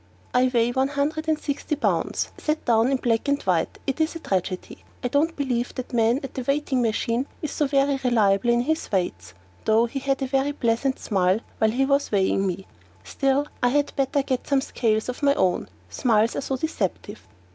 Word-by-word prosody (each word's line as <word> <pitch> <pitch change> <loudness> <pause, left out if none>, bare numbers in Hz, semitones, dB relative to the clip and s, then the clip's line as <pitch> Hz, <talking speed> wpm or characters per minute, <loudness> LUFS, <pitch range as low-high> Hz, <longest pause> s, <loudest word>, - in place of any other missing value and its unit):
I 250 +1 +4
weigh 240 -1 +2
one 265 +2 +1
hundred 295 +3 -2
and 315 -1 +2
sixty 295 0 -3
pounds, 295 - -1
set 305 +1 -2
down 230 +1 +3
in 270 - +2
black 230 -1 0
and 280 0 +2
white, 175 -4 +1
and - - -27
it 275 +3 -1
is 315 +1 0
a - - -5
tragedy! 185 - -3 0.2
I 245 - 0
don't 310 +5 +1
believe 250 -4 -2
that 255 -1 -6
man 235 +3 +2
at 270 - -6
the 260 - -4
weighing 275 0 0
machine 230 +3 0 0.2
is 305 - -2
so 295 - 0
very 275 0 +2
reliable 220 -3 +3
in 240 0 +3
his 315 +5 -2
weights, 95 - -2 0.3
though 220 +2 +4
he 255 +4 -4
had 270 0 -1
a - - +1
very 270 +2 0
pleasant 255 0 0
smile 190 0 +1 0.2
while 220 - +4
he 255 +5 +1
was 280 +1 +1
weighing 195 -1 +2
me. 185 +1 -4 0.4
Still, 275 - 0 0.2
I 245 - +4
had 290 +2 0
better 275 0 +1
get 260 -2 -2
some 275 -1 +2
scales 220 -4 0
of 250 +3 -5
my 280 -1 +4
own, 180 - +1 0.2
smiles 225 - +2
are - - -1
so 270 0 -2
deceptive. 220 - -3
255 Hz, 205 wpm, -24 LUFS, 225-280 Hz, 0.4 s, I